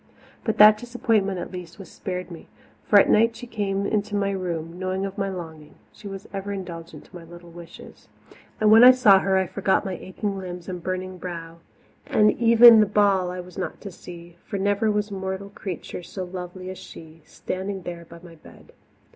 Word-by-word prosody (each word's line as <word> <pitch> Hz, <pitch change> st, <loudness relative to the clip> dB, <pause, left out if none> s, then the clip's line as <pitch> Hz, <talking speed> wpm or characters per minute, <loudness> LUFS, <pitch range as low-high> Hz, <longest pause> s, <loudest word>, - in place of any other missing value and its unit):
But 220 Hz, -, -2 dB
that 210 Hz, 0 st, +8 dB
disappointment, 225 Hz, -5 st, 0 dB
at 175 Hz, -, -6 dB
least, 180 Hz, -2 st, -9 dB
was 195 Hz, -, -12 dB
spared 180 Hz, -2 st, -6 dB
me, 165 Hz, -, -11 dB, 0.4 s
for 205 Hz, -, +6 dB
at -, -, +4 dB
night 230 Hz, +2 st, +3 dB
she 245 Hz, -, -9 dB
came 200 Hz, -4 st, -2 dB
into 205 Hz, 0 st, -1 dB
my 200 Hz, -1 st, 0 dB
room, 175 Hz, -3 st, -5 dB
knowing 185 Hz, +1 st, -2 dB
of 195 Hz, 0 st, -6 dB
my 195 Hz, -1 st, -2 dB
longing 160 Hz, -5 st, -9 dB, 0.2 s
she 210 Hz, -, -12 dB
was 195 Hz, 0 st, -8 dB
ever 195 Hz, +1 st, -5 dB
indulgent 170 Hz, -4 st, -8 dB
to -, -, -18 dB
my 175 Hz, -, -9 dB
little 175 Hz, +1 st, -14 dB
wishes. 170 Hz, 0 st, -13 dB, 0.5 s
And 215 Hz, 0 st, +4 dB
when 225 Hz, +2 st, +8 dB
I 250 Hz, -, +11 dB
saw 235 Hz, -7 st, +6 dB
her 190 Hz, 0 st, +1 dB
I 190 Hz, -, +1 dB
forgot 190 Hz, +2 st, 0 dB
my 190 Hz, -, -3 dB
aching 195 Hz, +2 st, -5 dB
limbs 180 Hz, -2 st, -8 dB
and 180 Hz, -2 st, -6 dB
burning 185 Hz, +1 st, -5 dB
brow, 170 Hz, -2 st, -8 dB, 0.5 s
and 210 Hz, 0 st, +4 dB
even 235 Hz, 0 st, +7 dB
the 210 Hz, -, +4 dB
ball 200 Hz, -3 st, +2 dB
I 180 Hz, 0 st, -5 dB
was 180 Hz, 0 st, -11 dB
not -, -, -5 dB
to 200 Hz, -, -8 dB
see, 175 Hz, -1 st, -12 dB
for 200 Hz, -, -5 dB
never 205 Hz, +2 st, +1 dB
was 210 Hz, 0 st, -1 dB
mortal 190 Hz, 0 st, -5 dB
creature 185 Hz, -3 st, -7 dB
so 185 Hz, +2 st, -7 dB
lovely 185 Hz, 0 st, -7 dB
as 185 Hz, -, -10 dB
she, 160 Hz, 0 st, -13 dB
standing 190 Hz, 0 st, -6 dB
there 170 Hz, -1 st, -7 dB
by 170 Hz, +1 st, -14 dB
my 170 Hz, -2 st, -13 dB
bed. 160 Hz, -, -17 dB
190 Hz, 200 wpm, -24 LUFS, 175-205 Hz, 0.5 s, I